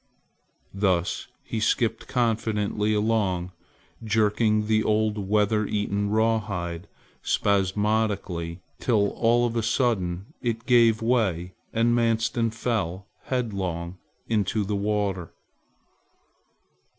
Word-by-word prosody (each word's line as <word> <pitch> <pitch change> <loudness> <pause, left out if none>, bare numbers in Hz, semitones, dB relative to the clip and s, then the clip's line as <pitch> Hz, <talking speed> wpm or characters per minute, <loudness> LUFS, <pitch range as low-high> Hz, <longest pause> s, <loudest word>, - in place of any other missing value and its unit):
Thus 95 -3 0 0.2
he 110 - -4
skipped 110 +1 0
confidently 110 -3 0
along 105 -5 0 0.5
jerking 110 0 +2
the 110 0 +2
old 105 -2 0
weather 105 0 +2
eaten 100 -1 -1
rawhide 100 -6 -1 0.3
spasmodically 100 -3 0 0.2
till 105 -5 +2
all 120 +1 +2
of 120 -1 -2
a 115 - +1
sudden 105 -6 0
it 115 -1 -2
gave 115 -3 +4
way 95 -7 +1 0.2
and 115 +1 +2
Manstin 115 0 +1
fell 105 -5 -2 0.2
headlong 95 -8 -3 0.3
into 105 -1 0
the 100 +1 -2
water. 100 -4 -1
105 Hz, 95 wpm, -25 LUFS, 95-115 Hz, 0.5 s, gave